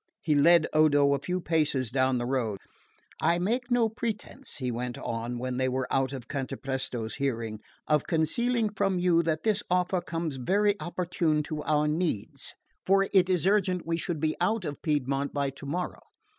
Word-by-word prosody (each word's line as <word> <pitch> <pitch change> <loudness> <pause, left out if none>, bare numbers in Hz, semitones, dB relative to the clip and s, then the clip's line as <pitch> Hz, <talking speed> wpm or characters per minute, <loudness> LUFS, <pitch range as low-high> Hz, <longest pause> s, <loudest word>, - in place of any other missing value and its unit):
he 155 - +2
led 160 +3 +6
Odo 145 -2 +5
a 140 - 0
few 180 +7 -2
paces 150 -8 0
down 130 0 +2
the 120 - -2
road. 120 -5 -1 0.6
"I 170 +2 +3
make 240 +8 -1
no 245 -2 +3
pretence," 230 +3 -5
he 130 -3 -2
went 120 +1 -4
on 120 0 -3
when 125 +1 -3
they 130 0 +1
were 130 0 -1
out 135 -1 +2
of 130 -4 -7
Cantapresto's 130 -4 -3
hearing, 115 -5 -2 0.3
"of 150 -1 +2
concealing 225 +8 +1
from 195 -2 0
you 175 -1 +3
that 160 -1 -1
this 210 -2 +2
offer 180 0 +1
comes 165 -4 -3
very 205 +10 +2
opportune 170 -3 0
to 155 0 -4
our 150 0 +2
needs, 155 - -2 0.3
for 195 +1 +3
it 190 -2 +5
is 180 -2 +1
urgent 190 -3 +2
we 165 0 0
should 170 -1 -3
be 155 +1 0
out 205 +2 +1
of 145 -2 -5
Piedmont 140 -2 0
by 140 -1 0
tomorrow. 145 +6 -4
155 Hz, 175 wpm, -28 LUFS, 135-180 Hz, 0.6 s, led